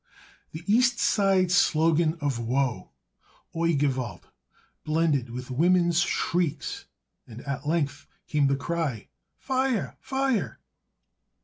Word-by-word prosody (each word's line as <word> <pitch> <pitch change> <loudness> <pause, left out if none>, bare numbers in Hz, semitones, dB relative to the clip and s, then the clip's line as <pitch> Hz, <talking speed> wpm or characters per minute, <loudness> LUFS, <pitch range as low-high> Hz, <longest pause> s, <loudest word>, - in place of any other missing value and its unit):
The 160 +2 -8
East 240 +3 +3
Side 195 -5 +2
slogan 165 -2 +3
of 140 -5 -1
woe, 125 +2 -1 0.7
"Oi 165 0 +1
gewalt," 130 -9 -1 0.6
blended 155 -5 +1
with 125 +2 -7
women's 175 +4 +3
shrieks, 165 -5 -1 0.4
and 120 +1 -10
at 140 0 -5
length 155 -3 -1 0.2
came 145 -2 +1
the 140 - +2
cry: 145 -6 -3 0.3
"Fie 265 - -6 0.2
urr! 205 - -4
Fie 265 -3 0
urr!" 130 - -7
155 Hz, 115 wpm, -26 LUFS, 135-175 Hz, 0.7 s, East